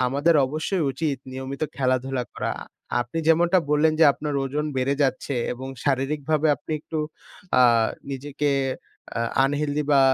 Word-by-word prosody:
আমাদের 145 +6 +2
অবশ্যই 155 +6 -1
উচিত 140 +1 -1 0.2
নিয়মিত 130 +2 -5
খেলাধুলা 130 -1 0
করা। - - -2 0.5
আপনি 120 +7 -4
যেমনটা 170 +3 +5
বললেন 150 +1 +4
যে, - - +8
আপনার 150 0 -4
ওজন 145 +3 -2
বেড়ে 130 +2 +1
যাচ্ছে 135 0 0 0.2
এবং 130 +2 -7 0.2
শারীরিকভাবে 145 +3 +1
আপনি 150 - -7
একটু 160 +1 -5 0.6
আ - - +8 0.5
নিজেকে 145 +2 -2 0.7
আ - - 0 0.2
আনহেলদি 145 +1 0
বা 140 - +6
145 Hz, 135 wpm, -24 LUFS, 135-155 Hz, 0.7 s, যে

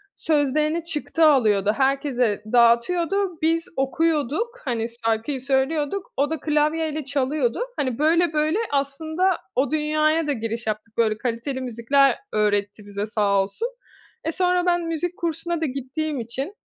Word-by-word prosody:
sözlerini 305 +2 +1
çıktı 325 0 0
alıyordu, 215 -9 +4
herkese 265 -6 +1
dağıtıyordu, 335 +11 +3
biz 330 +1 +1
okuyorduk, 320 - 0
hani, 235 -3 -1 0.2
şarkıyı 230 +5 0
söylüyorduk, 285 +7 -1
o 285 +1 +2
da 320 -2 -3
klavyeyle 305 +1 0
çalıyordu. 275 - 0 0.2
Hani, 260 -3 -1
böyle 330 +1 +3
böyle 310 +4 +1 0.2
aslında 315 +6 0 0.2
o 270 +4 +1
dünyaya 310 +1 +1
da 290 - +1
giriş 230 0 -4
yaptık. 215 +1 -4
Böyle, 220 -2 +2
kaliteli 250 +3 -3
müzikler 255 +3 +2
öğretti 205 0 0
bize 205 0 -4
sağ 205 -2 +2
olsun. 200 - -3 0.6
E, 325 - -1
sonra 360 0 +1
ben 350 -1 +2
müzik 335 +1 -3
kursuna 335 0 -2
da - - +1
gittiğim 275 +2 -3
için, 265 - -5
285 Hz, 135 wpm, -23 LUFS, 235-320 Hz, 0.6 s, alıyordu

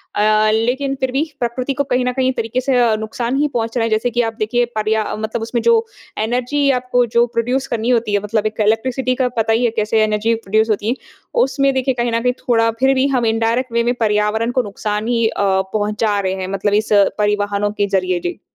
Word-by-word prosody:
अ, 215 +1 +3
लेकिन 250 +5 0
फिर 260 -1 -1
भी 275 +4 +1 0.2
प्रकृति 250 +3 -2
को 285 - 0
कहीं 255 -2 0
न 250 - +1
कहीं 260 0 +1
तरीके 240 +2 -2
से 265 0 0
अ, 235 -3 +3
नुकसान 235 +3 -3
ही 295 +1 +2
पहुँच 230 0 -2
रहा 235 - +1
है, 230 - 0
जैसे 220 +3 +1
कि 240 +1 +1
आप - - -10
देखिए 240 +3 +1
पर्या 215 0 +1
मतलब 220 +2 -4
उसमें 230 +1 -2
जो 460 -1 +3 0.3
एनर्जी 250 +6 0
आपको 245 0 +1
जो 235 - +6
प्रोड्यूस 250 +4 -1
करनी 230 0 -2
होती 230 -4 +1
है 205 - +3
मतलब 215 0 -1
एक 215 0 -4
इलेक्ट्रिसिटी 255 +4 0
का - - +2
पता 225 0 +2
ही 230 +2 +1
है 230 - +1
कैसे 215 0 +2
एनर्जी 215 +2 +1
प्रोड्यूस 220 0 0
होती 210 0 -1
है, 245 - +1 0.5
उसमें 275 0 +1
देखिए 260 0 0
कहीं 240 -1 -1
न 230 0 0
कहीं 250 - +2
थोड़ा 230 -1 +3
फिर 265 +1 +4
भी 265 +1 +2
हम 245 -2 +1
इनडायरेक्ट 230 +3 0
वे 235 - +2
में 240 +1 +1
पर्यावरण 215 +1 +1
को 255 +1 +1
नुकसान 210 +1 -3
ही 230 -2 +2
अ, 205 - -2 0.3
पहुँचा 210 0 0
रहे 190 -1 -1
हैं 185 - -3
मतलब 200 +1 0
इस 215 +1 +1 0.3
परिवहनों 205 0 0
के 200 - +3
ज़रिए। 185 -1 -1
जी। 175 0 -5
230 Hz, 225 wpm, -18 LUFS, 215-250 Hz, 0.5 s, जो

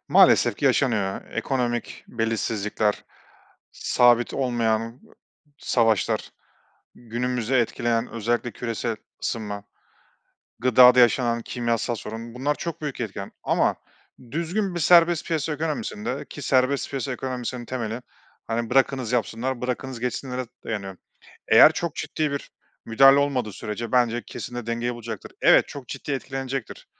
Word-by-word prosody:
Maalesef - - +5
ki - - -4
yaşanıyor. 105 -8 +1
Ekonomik 120 -3 -2
belirsizlikler, 110 -2 -1 0.7
sabit 120 -1 +3
olmayan 115 -2 -1 0.6
savaşlar, 115 -8 +1 0.6
günümüzü 120 +1 -2
etkileyen 120 -1 +1
özellikle 115 +1 -1
küresel 115 -1 -3 0.3
ısınma, 105 -3 -3 1.0
gıdada 125 +1 +7
yaşanan 120 -1 +3
kimyasal 115 0 -1
sorun 115 +2 -7
bunlar 145 +3 0
çok 170 -2 -5
büyük 145 -4 -4
etken 100 -3 -5
ama - - +2 0.6
düzgün 175 +4 -2
bir 175 - -2
serbest 170 0 +5
piyasa 160 -1 -1
ekonomisinde 140 -5 -3
ki 145 - -8
serbest 130 +1 +1
piyasa 135 -1 -3
ekonomisinin 125 -1 -4
temeli, 120 -1 -4 0.5
hani, 115 0 -2
bırakınız 130 -2 +2
yapsınlar, 120 +1 -1
bırakınız 125 0 -3
geçsinlere 125 +1 -3 0.2
dayanıyor. 100 -4 -5 0.5
Eğer 110 +8 +8
çok 170 -1 -3
ciddi 155 -2 -2
bir 140 - -5 0.4
müdahale 135 +4 +6
olmadığı 130 -7 0
sürece 105 +3 -5
bence 120 -1 +2
kesin 120 - -7
de 120 -2 -5
dengeyi 120 +1 -2
bulacaktır. 115 -3 -8
Evet, - - +5
çok 135 -4 -9
ciddi 145 - -5
etkilenecektir 135 -2 -5
120 Hz, 120 wpm, -24 LUFS, 115-135 Hz, 1.0 s, Eğer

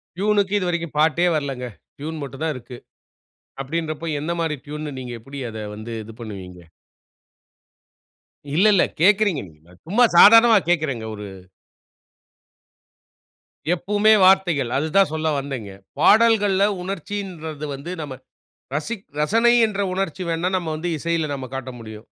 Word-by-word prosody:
ட்யூனுக்கு 205 +1 +1
இதுவரைக்கும் 170 -3 -2
பாட்டே 160 +3 +3
வரலங்க. 135 -4 -3 0.3
ட்யூன் 155 +1 -5
மட்டும் 135 +2 -7
தான் 160 -2 0
இருக்கு. 125 0 -10 0.9
அப்டின்றப்போ, 155 +2 -4
எந்த 160 +4 -2
மாரி 160 -2 -1
ட்யூன்ன்னு 150 -1 -6
நீங்க 125 -1 -6
எப்டி 135 +5 -9
அத 110 - -8 0.2
வந்து 110 +2 -8
இது 115 +1 -12
பண்ணுவீங்க? 95 -5 -8 2.0
இல்ல 185 +6 +4
இல்ல 195 - +4 0.2
கேக்குறீங்க. 200 -3 +3
நீங்க 80 +2 -22 0.2
சும்மா 220 +8 +3
சாதாரணமா 225 +3 +8
கேக்குறேங்க 150 -9 0
ஒரு 105 0 -8 2.5
எப்பவுமே 205 +4 +3
வார்த்தைகள். 175 -9 +3
அது 155 - -1
தான் 195 -6 +4
சொல்ல 160 0 -1
வந்தேன்ங்க, 130 -8 -6 0.3
பாடல்கள்ல 205 -1 +4 0.2
உணர்ச்சின்றது 180 -5 -5
வந்து 140 +6 -8
நம்ம 145 -3 -6 0.6
ரசிக் 195 +8 -4
ரசனை 230 +10 +3
என்ற 200 -2 -4
உணர்ச்சி 190 -2 -3
வேண்ணா 165 +2 0
நம்ம 175 -3 -3
வந்து 170 +3 -3
இசையில 165 0 -1
நம்ம 135 -2 -6
காட்ட 135 -1 -5
முடியும். 110 -1 -10
160 Hz, 125 wpm, -22 LUFS, 135-195 Hz, 2.5 s, சாதாரணமா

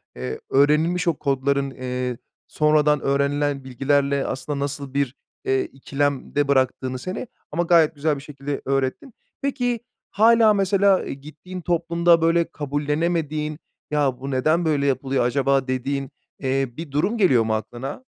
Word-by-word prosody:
eee, 65 +1 -5
öğrenilmiş 155 +6 +3
o 170 - +4
kodların, 140 0 0
eee, 125 -1 -3 0.3
sonradan 150 -1 +3
öğrenilen 140 0 0
bilgilerle 140 +2 +1
aslında 140 +2 -3
nasıl 140 -1 -4
bir, 140 -2 0 0.3
eee, 130 0 +2
ikilemde 140 +1 -2
bıraktığını 130 -1 +1
seni 185 - -5 0.2
ama 170 +3 0
gayet 165 -2 +4
güzel 150 +1 0
bir - - -8
şekilde 140 -1 -5
öğrettin. 135 - -1 0.3
Peki, 245 -4 -1 0.3
hâlâ 225 0 +5
mesela 195 -1 +2
gittiğin 155 +6 -8
toplumda, 170 0 +2
böyle, 165 +1 +2
kabullenemediğin 150 +1 -2 0.3
"Ya, 140 -4 +1
bu 135 +1 -5
neden 155 +6 +2
böyle 145 -3 +1
yapılıyor 135 -1 +1
acaba?" 135 +1 +1
dediğin, 135 +1 -2 0.3
eee, 135 -1 0
bir 160 -3 -7
durum 155 +11 0
geliyor 135 - +4
mu 110 0 -1
aklına? 120 - -5
145 Hz, 135 wpm, -23 LUFS, 135-165 Hz, 0.3 s, hâlâ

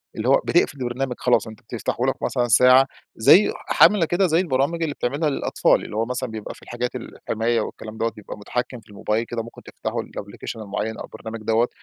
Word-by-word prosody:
اللي 110 +2 -3
هو 135 - +5
بتقفل 160 -4 +2
البرنامج 125 +1 -2
خلاص 125 -2 +2
أنت 110 -1 -11
بتفتحهولك 120 +3 -2
مثلًا 125 -2 0
ساعة، 125 +4 +6 0.3
زي 180 - +6 0.3
عاملة 200 -6 +7
كده 180 +3 +2
زي 165 0 +3
البرامج 165 0 0
اللي 150 -3 -2
بتعملها 145 +5 0
للأطفال 140 - +1
اللي - - -8
هو 115 +1 +1
مثلًا 125 0 -3
بيبقى 110 -1 -7
في - - -18
الحاجات 120 +1 -4
الحماية 115 -1 -2
والكلام 110 0 -7
دَوَّة 115 0 0
بيبقى 105 -1 -10
متحكم 125 +4 -4
في - - -25
الموبايل 105 +2 -1
كده 115 -1 -4
ممكن 115 - -12
تفتحوا - - -4
الأبليكيشن 110 - -8
المعيّن 110 +2 -3
أو - - -6
البرنامج 115 0 -8
دوّة 115 +2 +3
120 Hz, 195 wpm, -23 LUFS, 110-135 Hz, 0.3 s, عاملة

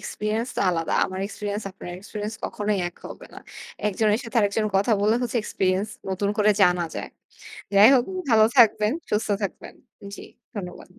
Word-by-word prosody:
Experience 220 +3 -3
তো - - 0
আলাদা। 165 -2 -2
আমার 185 0 -6
এক্সপেরিয়েন্স 205 0 -5
আপনার 185 -1 -10
এক্সপেরিয়েন্স 210 +2 -6
কখনোই 210 -1 -2
এক 175 - -18
হবে - - -10
না। - - -8 0.5
একজনের 210 +1 +1
সাথে 230 +1 -6
আরেকজন 210 +1 +1
কথা 200 +4 +2
বললে 215 +3 +3
হচ্ছে 245 0 -2
এক্সপেরিয়েন্স 190 +1 -1 0.2
নতুন 195 +2 -1
করে 210 0 +4
জানা 180 -1 +3
যায়। - - -6 0.6
যাই 205 +3 +8
হোক, 245 -1 +3 0.3
ভালো 220 -1 +6
থাকবেন, 215 -1 +5 0.2
সুস্থ 210 +1 0
থাকবেন। 195 - -5 0.4
জি, - - -10 0.3
ধন্যবাদ। 180 -2 -8
210 Hz, 165 wpm, -24 LUFS, 195-220 Hz, 0.6 s, যাই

